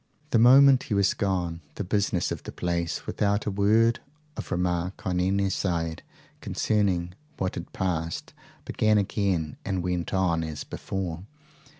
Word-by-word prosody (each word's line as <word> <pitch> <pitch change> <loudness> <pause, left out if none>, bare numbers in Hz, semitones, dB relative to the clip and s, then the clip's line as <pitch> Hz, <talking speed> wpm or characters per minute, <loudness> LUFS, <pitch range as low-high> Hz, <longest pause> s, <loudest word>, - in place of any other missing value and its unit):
The 115 - +4
moment 135 +2 +7
he 105 - +1
was 100 0 +3
gone, 90 -4 -1
the - - -3
business 100 -2 0
of - - -4
the - - -8
place, 85 -1 -2
without 100 0 0
a 105 - -1
word 110 +4 +3 0.4
of - - -6
remark 90 +1 -1
on 90 -1 0
any 95 +1 +1
side 85 -4 -1 0.4
concerning 95 -5 0 0.2
what 95 - -1
had 85 - -7
passed, 85 -4 -3 0.3
began 110 0 +2
again 95 -6 0
and 95 -3 -2
went 90 -2 -2
on 90 -4 +1
as 80 -2 -5
before. 90 -2 -5
95 Hz, 150 wpm, -26 LUFS, 85-100 Hz, 0.4 s, moment